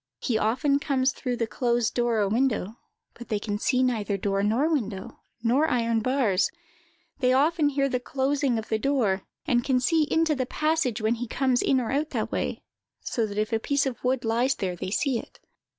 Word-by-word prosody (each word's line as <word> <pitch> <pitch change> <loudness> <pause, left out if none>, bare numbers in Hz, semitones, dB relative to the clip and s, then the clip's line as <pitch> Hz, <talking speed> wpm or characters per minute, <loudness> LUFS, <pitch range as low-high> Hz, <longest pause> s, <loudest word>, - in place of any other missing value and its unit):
He 245 - -2
often 260 +7 +2
comes 270 -2 +1
through 250 -2 -3
the 230 - 0
closed 235 +1 0
door 240 -3 +1
or 200 - +2
window, 225 -1 0 0.3
but 240 - -12
they 215 - +1
can 205 0 -4
then 205 - -2
see 255 +2 +2
neither 220 -5 0
door 195 0 0
nor 225 +9 +2
window, 220 -12 -3 0.2
nor 265 +7 +3
iron 230 -2 +1
bars; 225 -5 +1 0.7
they 255 -2 +3
often 300 +3 +3
hear 275 -1 +1
the 255 -2 -1
closing 270 0 0
of 220 - -5
the 220 - 0
door, 225 -8 +1 0.2
and 245 -6 +2
can 260 -1 +2
see 310 +5 +2
into 320 -1 +2
the 260 -3 -2
passage 305 -8 0
when 220 +2 +3
he 245 - -2
comes 255 +1 +1
in 265 - +2
or 235 -3 -2
out 295 +3 0
that - - -3
way, - - -3 0.4
so 230 -3 -1
that 205 0 -7
if 215 +1 -1
a 225 - +2
piece 280 +4 0
of 260 -3 -4
wood 255 -1 0
lies 240 +4 +1
there 185 -2 -3
they 175 - -5
see 250 +4 0
it. - - -13
245 Hz, 210 wpm, -26 LUFS, 220-275 Hz, 0.7 s, nor